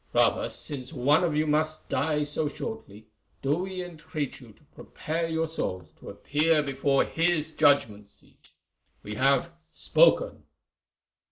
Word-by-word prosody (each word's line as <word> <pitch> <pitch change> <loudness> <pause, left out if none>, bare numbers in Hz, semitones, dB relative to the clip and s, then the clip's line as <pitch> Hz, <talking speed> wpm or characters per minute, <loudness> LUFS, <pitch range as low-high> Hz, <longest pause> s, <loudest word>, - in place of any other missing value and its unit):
Rather, - - +2
since 130 -3 -5
one 145 +3 +3
of 165 -4 0
you 155 +1 +2
must 155 +1 0
die 150 +3 0
so 150 +1 0
shortly, 110 - -7 0.4
do 140 +2 +2
we 185 0 -4
entreat 155 -5 -6
you 120 -3 -14
to 130 - -25
prepare 165 +2 -4
your 160 0 -1
souls 95 - -4
to - - -10
appear 155 +1 +1
before 135 0 +1
His 165 -2 0
judgment 125 -10 +2
seat. - - -17 0.5
We 105 - -6
have 135 +8 +2 0.2
spoken." - - +2
150 Hz, 140 wpm, -27 LUFS, 135-165 Hz, 0.5 s, one